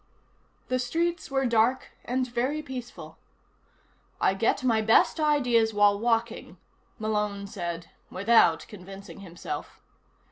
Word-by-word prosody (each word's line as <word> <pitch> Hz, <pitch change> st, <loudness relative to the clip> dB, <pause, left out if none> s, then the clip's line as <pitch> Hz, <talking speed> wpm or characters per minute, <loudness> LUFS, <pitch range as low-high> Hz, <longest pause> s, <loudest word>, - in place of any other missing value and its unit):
The 255 Hz, 0 st, 0 dB
streets 335 Hz, +6 st, -1 dB
were 270 Hz, -1 st, 0 dB
dark 235 Hz, +2 st, +1 dB
and 255 Hz, +1 st, 0 dB
very 255 Hz, +6 st, -2 dB
peaceful. 255 Hz, -3 st, -9 dB, 1.0 s
I -, -, +3 dB
get 225 Hz, +6 st, 0 dB
my 230 Hz, -3 st, +2 dB
best 225 Hz, +8 st, +4 dB
ideas 245 Hz, -8 st, +2 dB
while 205 Hz, -1 st, +4 dB
walking, 230 Hz, 0 st, -1 dB, 0.4 s
Malone 210 Hz, -2 st, -2 dB
said 175 Hz, -4 st, -6 dB, 0.2 s
without 190 Hz, -5 st, +3 dB
convincing 195 Hz, 0 st, -11 dB
himself. 175 Hz, -3 st, -7 dB
230 Hz, 110 wpm, -27 LUFS, 200-255 Hz, 1.0 s, best